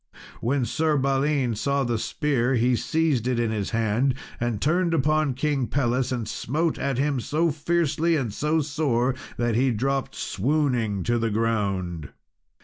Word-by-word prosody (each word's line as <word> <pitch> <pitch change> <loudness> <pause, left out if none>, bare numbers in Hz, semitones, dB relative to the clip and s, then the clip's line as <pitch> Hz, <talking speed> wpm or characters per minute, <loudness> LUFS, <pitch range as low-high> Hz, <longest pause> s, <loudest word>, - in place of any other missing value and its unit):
When 130 +2 0
Sir 155 +3 +1
Balin 135 -1 +1
saw 140 +5 0
the 120 -3 -1
spear 135 -1 0
he 125 +1 +3
seized 155 -4 0
it 125 -2 +1
in 115 -2 0
his 105 -3 -2
hand, 115 +4 +1 0.2
and 120 -3 -1
turned 170 - +1
upon 150 -2 +1
King 135 -2 0
Pelles, 130 -1 0
and 120 -4 -2
smote 155 +6 -1
at 140 -2 -1
him 140 0 +1
so 160 +7 0
fiercely 165 +1 +1
and 125 -9 -2
so 155 +6 +1
sore 135 -4 0 0.2
that 120 -1 0
he 130 +4 +3
dropped 135 +4 -1
swooning 120 -5 0
to 120 0 +1
the 115 0 0
ground. 100 -8 -1
130 Hz, 155 wpm, -25 LUFS, 115-150 Hz, 0.2 s, he